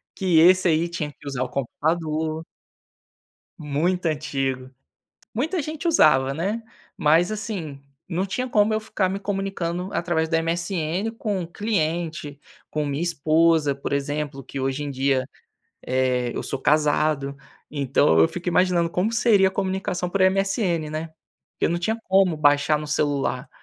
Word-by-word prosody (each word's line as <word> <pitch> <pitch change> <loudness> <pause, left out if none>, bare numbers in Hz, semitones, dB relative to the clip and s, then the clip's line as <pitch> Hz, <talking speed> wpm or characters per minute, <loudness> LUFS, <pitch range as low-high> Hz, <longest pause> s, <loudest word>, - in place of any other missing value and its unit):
Que 180 -5 +3
esse 185 +3 +6
aí 165 +1 +2
tinha 155 -3 -4
que 145 - -15
usar 135 -2 -2
o 125 - -5
computador. 155 +4 -2 1.1
Muito 165 +4 -1
antigo, 135 -4 -2 0.6
muita 315 - -1
gente 310 +3 -4
usava, 135 - +4
né. 200 +9 -2 0.3
Mas 165 +5 +3
assim, 195 -10 -5 0.3
não 185 +2 -1
tinha 250 +6 -3
como 215 0 +3
eu 215 - +1
ficar 210 -3 -1
me 195 +2 -3
comunicando 195 -3 -3
através 170 -2 0
do 165 - 0
MSN 170 +4 -1
com 205 -5 -3
cliente, 165 -6 -2 0.3
com 150 -1 -1
minha 145 +3 -2
esposa 160 -2 +2
por 140 - -4
exemplo, 140 0 -2
que 135 - -7
hoje 135 +2 -1
em 145 - -4
dia, 135 -1 0 0.6
eh 125 -1 +1
eu - - -3
sou 135 - -3
casado. 150 -1 +1 0.4
Então 135 - +2
eu 80 - +6
fico 180 0 -4
imaginando 175 -1 +2
como 180 +6 0
seria 225 -5 +4
a - - -2
comunicação 190 -2 -2
por 195 +2 0
MSN, 190 -4 +1
né? 155 +1 -5 0.4
Porque - - 0
não 170 +1 -1
tinha 220 +6 -1
como 190 -3 +4
baixar 145 0 +3
no 150 0 -6
celular. 145 -2 -1
165 Hz, 150 wpm, -23 LUFS, 145-190 Hz, 1.1 s, esse